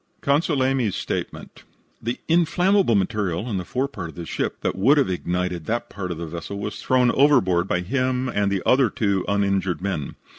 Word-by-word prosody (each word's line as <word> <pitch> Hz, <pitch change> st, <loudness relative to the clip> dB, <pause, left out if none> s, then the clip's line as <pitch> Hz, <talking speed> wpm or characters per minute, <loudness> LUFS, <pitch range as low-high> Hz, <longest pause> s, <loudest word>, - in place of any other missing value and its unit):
CONSUL 140 Hz, -1 st, +2 dB
AYME'S 130 Hz, -6 st, +1 dB
STATEMENT -, -, -5 dB, 0.4 s
The 120 Hz, +2 st, -3 dB
inflammable 175 Hz, -, +3 dB
material 100 Hz, -1 st, -1 dB
in 105 Hz, -5 st, -2 dB
the 90 Hz, -, -3 dB
forepart 130 Hz, -, -3 dB
of -, -, -12 dB
the 85 Hz, -, -6 dB
ship -, -, -3 dB
that -, -, -1 dB
would 130 Hz, +10 st, +4 dB
have 135 Hz, -9 st, +2 dB
ignited 90 Hz, -1 st, -2 dB
that 120 Hz, +1 st, -2 dB
part 95 Hz, -2 st, -5 dB
of 85 Hz, -, -4 dB
the 85 Hz, -, -5 dB
vessel 85 Hz, +5 st, -6 dB
was 105 Hz, +1 st, -5 dB
thrown 125 Hz, -2 st, +3 dB
overboard 95 Hz, -11 st, +3 dB
by 90 Hz, -, 0 dB
him 130 Hz, +5 st, -1 dB
and 100 Hz, -4 st, 0 dB
the 95 Hz, -2 st, -1 dB
other 130 Hz, -2 st, +4 dB
two 100 Hz, -2 st, 0 dB
uninjured 100 Hz, -4 st, 0 dB
men. 90 Hz, -7 st, -3 dB
100 Hz, 185 wpm, -23 LUFS, 90-130 Hz, 0.4 s, would